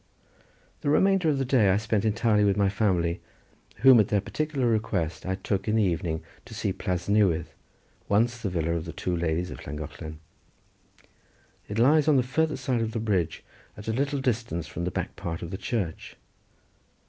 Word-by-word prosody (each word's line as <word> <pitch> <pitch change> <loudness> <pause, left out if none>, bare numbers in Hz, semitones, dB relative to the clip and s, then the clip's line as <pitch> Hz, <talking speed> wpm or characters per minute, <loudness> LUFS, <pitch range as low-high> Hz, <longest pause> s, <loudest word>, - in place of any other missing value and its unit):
The - - -1
remainder 190 +2 +3
of 145 - +1
the 135 - 0
day 120 -6 +4
I 95 - +4
spent 105 0 0
entirely 110 -1 +2
with 100 -1 +2
my 100 -1 +3
family, 95 -4 0 0.6
whom 130 -2 +8
at 105 - +4
their 105 - +2
particular 145 +5 -2
request 105 -8 -1
I 95 - 0
took 100 +1 -2
in 110 - +2
the 110 - +3
evening 85 -3 -1 0.2
to 115 - -10
see 105 -2 -1
Plas 90 -1 -3
Newydd, 100 -6 +3 0.6
once 115 +3 +2
the 110 -4 -2
villa 85 -2 -1
of 85 -1 -2
the - - -7
two 90 - -2
ladies 85 +1 -1
of - - -8
Llangollen. 75 +2 -7 1.5
It 105 - -4
lies 145 +6 +4
on 150 -3 +5
the 130 - +3
farther 155 +4 0
side 130 -3 -1
of 110 -1 -2
the 115 - -1
bridge, 100 -7 -1 0.3
at 105 - -10
a 110 - 0
little 140 +3 0
distance 115 -10 -1
from 80 +3 -5
the - - 0
back - - -4
part 85 0 -5
of 85 - -6
the - - -3
church. 95 -10 -3
105 Hz, 190 wpm, -27 LUFS, 85-120 Hz, 1.5 s, whom